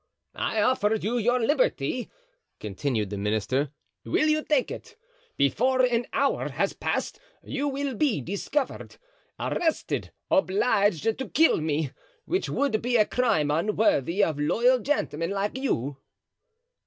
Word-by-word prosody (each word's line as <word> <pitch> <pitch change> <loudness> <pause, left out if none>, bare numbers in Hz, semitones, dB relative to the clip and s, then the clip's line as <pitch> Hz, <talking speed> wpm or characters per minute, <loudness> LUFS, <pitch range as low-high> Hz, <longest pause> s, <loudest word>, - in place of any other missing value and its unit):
"I 215 -2 0
offered 220 -3 +1
you 240 +3 0
your 245 +3 +2
liberty," 295 - 0 0.5
continued 105 0 -2
the 100 - -3
minister; 110 +7 0 0.3
"will 310 - +1
you 305 0 +2
take 290 -5 +1
it? 455 - -9 0.4
Before 255 - +2
an 245 -1 +1
hour 275 0 0
has - - -1
passed - - -2 0.2
you 290 0 -2
will 280 -1 -2
be 245 - +1
discovered, 200 - -3 0.4
arrested, 325 -2 -1 0.2
obliged 205 - +2
to 225 +4 -1
kill 325 +4 +4
me, 150 -2 -1 0.3
which 370 +3 -1
would 255 -5 0
be 245 +1 +2
a 215 - +5
crime 215 -14 +1
unworthy 185 0 +2
of 155 -3 0
loyal 240 +12 +3
gentlemen 175 - -1
like 200 +2 -2
you." 145 - -2
220 Hz, 130 wpm, -26 LUFS, -, 0.5 s, a